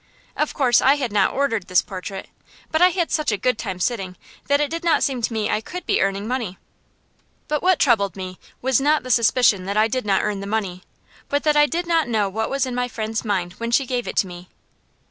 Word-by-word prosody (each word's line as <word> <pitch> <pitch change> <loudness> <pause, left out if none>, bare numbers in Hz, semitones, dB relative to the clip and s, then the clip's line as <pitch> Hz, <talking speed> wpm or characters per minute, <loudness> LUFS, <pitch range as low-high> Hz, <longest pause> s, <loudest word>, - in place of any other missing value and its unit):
Of 300 - -1
course 250 -4 +4
I 270 +2 +5
had 260 -6 -3
not 205 -2 +2
ordered 230 -8 -1
this 180 -1 +3
portrait, 190 0 -7 0.4
but 315 - +1
I 360 - +7
had 345 -2 -1
such 305 -5 +1
a 210 - 0
good 250 +4 0
time 190 -5 -4
sitting 190 -3 -2 0.3
that 285 0 +3
it 295 0 0
did 335 +1 -4
not 335 -2 +3
seem 260 -3 -1
to 230 - -1
me 220 -2 -1
I 210 - 0
could 360 +10 -7
be - - +1
earning 195 +2 -1
money. 235 -7 -3 0.9
But 300 -1 -1
what 370 -1 +3
troubled 210 -8 +2
me 185 -1 -7 0.2
was 265 0 +2
not 300 +2 +2
the 255 - -3
suspicion 230 -4 +3
that 200 +2 -2
I 215 +1 +4
did 255 +3 -2
not 195 -1 +2
earn 210 -2 -1
the 200 - -6
money, 200 -4 -2 0.5
but 285 0 0
that 300 -1 +2
I 295 0 +5
did 345 +3 -2
not 330 -3 +1
know 210 -4 +1
what 220 +3 -2
was 275 0 0
in 255 - -4
my 245 0 -1
friend's 220 -2 -3
mind 185 -5 -1
when 230 0 -3
she 265 +3 +2
gave 245 -1 -2
it - - -4
to - - +3
me. 180 0 -11
230 Hz, 240 wpm, -22 LUFS, 200-280 Hz, 0.9 s, I